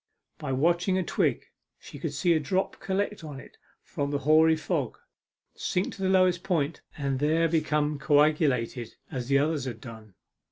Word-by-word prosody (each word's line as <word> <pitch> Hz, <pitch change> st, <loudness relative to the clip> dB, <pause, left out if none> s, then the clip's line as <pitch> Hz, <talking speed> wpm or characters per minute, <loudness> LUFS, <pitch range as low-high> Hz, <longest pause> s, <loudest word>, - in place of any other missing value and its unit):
By 150 Hz, -4 st, -4 dB
watching 175 Hz, +7 st, +2 dB
a 185 Hz, -, +1 dB
twig -, -, 0 dB, 0.3 s
she -, -, -11 dB
could -, -, -3 dB
see 175 Hz, -3 st, +2 dB
a 160 Hz, -, +2 dB
drop 185 Hz, +6 st, -1 dB
collect 200 Hz, +2 st, -2 dB
upon 150 Hz, -4 st, -8 dB
it -, -, -15 dB, 0.2 s
from 140 Hz, 0 st, -3 dB
the 145 Hz, -, 0 dB
hoary 155 Hz, +3 st, +5 dB
fog, 155 Hz, -, -2 dB, 0.6 s
sink 180 Hz, -, -2 dB
to -, -, -10 dB
the 190 Hz, -, +1 dB
lowest 185 Hz, -2 st, +3 dB
point, 165 Hz, -5 st, -1 dB, 0.2 s
and 140 Hz, -3 st, -1 dB
there 160 Hz, +3 st, +2 dB
become 150 Hz, -2 st, 0 dB
coagulated 145 Hz, -6 st, +2 dB, 0.2 s
as 125 Hz, -5 st, -4 dB
the 140 Hz, 0 st, +4 dB
others 145 Hz, -1 st, 0 dB
had 120 Hz, -3 st, -5 dB
done. 110 Hz, -4 st, -11 dB
150 Hz, 170 wpm, -27 LUFS, 140-170 Hz, 0.6 s, hoary